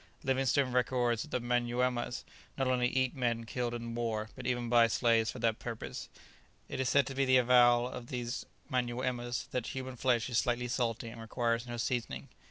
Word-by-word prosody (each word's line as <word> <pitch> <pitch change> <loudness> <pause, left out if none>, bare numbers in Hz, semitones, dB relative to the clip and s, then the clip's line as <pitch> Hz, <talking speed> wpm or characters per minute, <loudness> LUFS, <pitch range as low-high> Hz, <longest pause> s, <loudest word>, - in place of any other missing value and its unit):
Livingstone 135 0 +2
records 120 -2 +1
that - - -7
the - - -1
Manyuemas 120 0 0 0.3
not 135 -2 +1
only 125 -1 +2
eat 130 0 0
men 120 -3 0
killed 120 0 -2
in 115 0 -5
war, 110 -2 -2
but 125 - -6
even 120 -1 0
buy 120 -1 +6
slaves 115 -1 +2
for - - -5
that 115 -1 0
purpose; 115 -2 -6 0.6
it - - -5
is 130 -2 +1
said 140 -1 +4
to 135 - -5
be 135 +1 +1
the 130 -1 +5
avowal 120 -1 +5
of 125 -1 -7
these 120 -1 -3 0.2
Manyuemas 120 -1 -1
that 125 -2 -2
"human 130 -1 -5
flesh 120 -2 +2
is 120 -3 +2
slightly 125 0 0
salt, 120 -2 -1
and 115 0 -8
requires 115 +1 -1
no 120 0 -5
seasoning." 120 0 -2
120 Hz, 185 wpm, -32 LUFS, 120-125 Hz, 0.6 s, buy